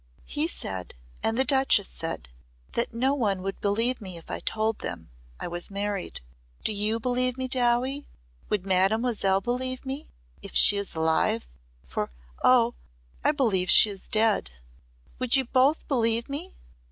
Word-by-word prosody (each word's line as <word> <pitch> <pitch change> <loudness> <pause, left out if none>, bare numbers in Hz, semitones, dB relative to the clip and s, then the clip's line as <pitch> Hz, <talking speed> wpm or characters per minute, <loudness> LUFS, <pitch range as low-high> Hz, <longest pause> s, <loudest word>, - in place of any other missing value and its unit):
"He 300 +2 0
said 95 - -4 0.3
and 225 +1 0
the 265 - +3
Duchess 265 -8 +3
said 165 - -5 0.4
that 235 - -1
no 255 +4 +1
one 205 -9 -1
would 195 0 -5
believe 230 +5 +1
me 185 -4 -6
if 165 - -10
I - - -3
told 220 0 -1
them 80 -6 -6 0.3
I - - -4
was 175 0 -5
married. 200 -1 -4 0.4
Do - - +2
you 210 +2 +1
believe 250 +1 0
me, 260 0 -2
Dowie? 255 +2 +1 0.4
Would 205 -3 -1
Mademoiselle 195 +1 +2
believe 255 +4 -2
me 270 +3 -6 0.3
if - - -10
she 205 - +7
is 200 -3 -3
alive 160 - +1 0.4
for - - -3 0.3
Oh! 240 -2 +5 0.5
I - - +4
believe 210 -11 +1
she 210 - +8
is 195 -2 -4
dead! 215 - +2 0.7
Would 255 +1 +4
you 265 -1 +2
both 265 +5 +2
believe 230 -3 +1
me?" 310 +7 -5
225 Hz, 155 wpm, -26 LUFS, 195-255 Hz, 0.7 s, she